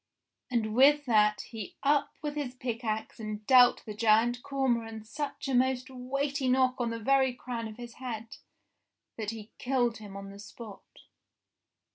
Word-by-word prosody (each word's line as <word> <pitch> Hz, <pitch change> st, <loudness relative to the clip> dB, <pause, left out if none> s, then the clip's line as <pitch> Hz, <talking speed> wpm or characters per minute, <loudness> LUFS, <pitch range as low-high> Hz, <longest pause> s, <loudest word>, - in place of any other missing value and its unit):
And 225 Hz, -4 st, 0 dB
with 285 Hz, +4 st, +5 dB
that 210 Hz, -3 st, +3 dB
he 220 Hz, -5 st, -8 dB
up 285 Hz, 0 st, +3 dB
with 295 Hz, -1 st, -2 dB
his 280 Hz, -4 st, -4 dB
pickaxe 230 Hz, -3 st, -3 dB
and 215 Hz, -1 st, -5 dB
dealt 250 Hz, -1 st, +6 dB
the 215 Hz, -, -6 dB
Giant 230 Hz, +3 st, +3 dB
Cor 275 Hz, 0 st, -1 dB
moran 225 Hz, -3 st, -1 dB
such 285 Hz, +5 st, -5 dB
a 270 Hz, -, -1 dB
most 255 Hz, +1 st, +1 dB
weighty 275 Hz, +2 st, -2 dB
knock 255 Hz, 0 st, +4 dB
on 235 Hz, -, 0 dB
the 230 Hz, -, -3 dB
very 265 Hz, +2 st, +2 dB
crown 240 Hz, -2 st, -5 dB
of 215 Hz, -, -10 dB
his 240 Hz, -1 st, -8 dB
head, 225 Hz, -3 st, -6 dB, 0.8 s
that 215 Hz, -2 st, -4 dB
he 220 Hz, -1 st, -7 dB
killed 245 Hz, -3 st, +1 dB
him 205 Hz, -2 st, -9 dB
on 195 Hz, 0 st, -8 dB
the 200 Hz, -, -12 dB
spot. 205 Hz, 0 st, -10 dB
240 Hz, 165 wpm, -30 LUFS, 220-260 Hz, 0.8 s, dealt